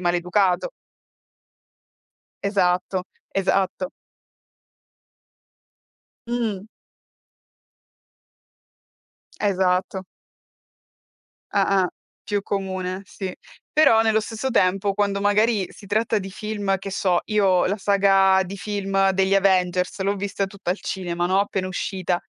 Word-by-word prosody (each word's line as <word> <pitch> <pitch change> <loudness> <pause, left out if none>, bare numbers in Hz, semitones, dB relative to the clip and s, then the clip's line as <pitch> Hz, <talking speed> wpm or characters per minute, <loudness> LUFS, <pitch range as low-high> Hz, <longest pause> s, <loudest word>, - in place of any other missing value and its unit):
maleducato. 180 - +1 1.7
Esatto, 185 -1 +1 0.3
esatto. 195 +8 0 2.4
Mh. 225 -5 -2 2.8
Esatto. 190 -1 +1 1.5
Ah-ah. 195 -2 +2 0.4
Più 205 -1 0
comune, 190 -1 -3
sì. 190 -1 -6 0.4
Però 295 -8 +5
nello 220 -1 +3
stesso 225 +4 -4
tempo 195 -1 +2
quando 200 -1 0
magari 205 -1 +2
si 205 - -14
tratta 220 +2 +1
di 195 0 -7
film, 205 -1 -2
che 195 +1 -7
so, 185 -2 +1
io 195 -4 +3
la 200 +3 0
saga 195 -1 +4
di 195 +2 -7
film 195 -1 0
degli 190 +1 +2
Avengers 185 -1 +2
l'ho 200 +1 +1
vista 195 0 -2
tutta 195 -2 -5
al 185 - -1
cinema, 175 -2 -2
no, 190 +2 +3
appena 195 -2 -2
uscita. 185 -1 -2
195 Hz, 95 wpm, -23 LUFS, 185-205 Hz, 2.8 s, Però